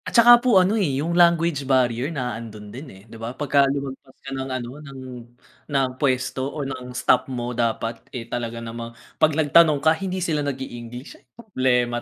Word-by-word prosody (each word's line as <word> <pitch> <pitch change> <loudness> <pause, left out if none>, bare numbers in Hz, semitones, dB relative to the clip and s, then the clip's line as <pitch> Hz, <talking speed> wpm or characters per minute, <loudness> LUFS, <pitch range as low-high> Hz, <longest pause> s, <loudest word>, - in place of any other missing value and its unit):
At - - 0
saka 240 +1 +8
po 245 -5 +4
ano 185 +2 +4
eh, 140 -8 0
yung 160 +5 -1
language 170 -3 +3
barrier 125 0 +2
na 130 -7 -3
andun 105 -2 -9
din 135 +3 -9
eh, 95 -3 -14
di 115 0 -13
ba, 120 +3 -6
pagka 140 -2 +3
lumagpas 135 -1 -5
ka 135 - -6
ng 135 0 -4
ano 130 -2 -4
ng 135 -3 -10 0.7
ng 135 -2 +1
pwesto 130 -1 0
o 145 -1 -5
ng 130 -2 -6
staff 125 +2 +1
mo 125 -1 -3
dapat 115 -1 -2
eh 120 -2 -6
talaga 115 0 -4
namang 115 0 -7 0.2
pag 155 -1 +4
nagtanong 155 0 +5
ka 160 +3 +3
hindi 185 +3 -4
sila 165 -5 -1
nag-i-English 125 -3 -6 0.2
problema 125 - 0
130 Hz, 185 wpm, -23 LUFS, 120-150 Hz, 0.7 s, saka